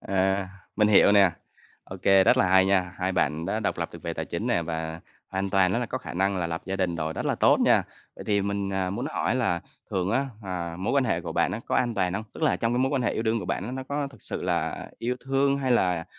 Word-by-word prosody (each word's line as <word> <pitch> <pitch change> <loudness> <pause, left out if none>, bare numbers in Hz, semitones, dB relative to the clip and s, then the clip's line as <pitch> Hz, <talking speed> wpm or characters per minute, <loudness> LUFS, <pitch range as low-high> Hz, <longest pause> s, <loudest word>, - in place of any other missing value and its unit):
Ờ, 95 0 0 0.3
mình 105 -1 +4
hiểu 100 -1 +6
nè. 100 -3 +6 0.5
OK, 95 -1 -10
rất 95 -1 +5
là 95 - +3
hay 95 0 +5
nha. 95 -2 +1
Hai 95 0 -1
bạn 80 -2 0
đã 110 +3 -1
độc - - -2
lập - - -2
được - - -11
về - - -3
tài - - -3
chính - - -4
nè, 85 - +1
và 80 0 -4 0.3
an 95 +1 -2
toàn 95 -1 +3
á 115 - +1
là 125 - -2
có 130 - -3
khả - - -8
năng 95 +2 +1
là 90 -2 -1
lập 80 0 -4
gia 95 0 -2
đình 90 -3 -1
rồi, 80 0 -2
rất - - -4
là - - +1
tốt - - +4
nha. - - +4 0.3
Vậy - - -9
thì 100 -1 +1
mình, 100 -1 -2
à, 95 -1 -1
muốn 120 +8 -3
hỏi - - 0
là 110 -9 0 0.3
thường 95 +1 -1
á, 135 +4 +1 0.2
à, 85 -3 -4
mối 95 - -1
quan 140 -2 +3
hệ 100 -8 0
của 85 -2 -6
bạn 85 +2 +1
á 110 - -4
có - - 0
an 120 -2 +1
toàn 90 -4 0
hông? 110 +2 -3
Tức - - -9
là 155 - +3
trong 115 0 0
cái 120 - +1
mối 130 +1 +2
quan 135 -3 0
hệ 120 - +1
yêu - - -2
đương 115 0 +1
của 100 - -5
bạn, 115 +9 -3
nó 130 - -4
có 145 0 -1
thực 130 - -17
sự - - -5
là - - -2
yêu 125 +2 -2
thương, 135 +1 +2
hay 130 -2 +1
là, 90 -7 +2
95 Hz, 280 wpm, -26 LUFS, 90-115 Hz, 0.5 s, hiểu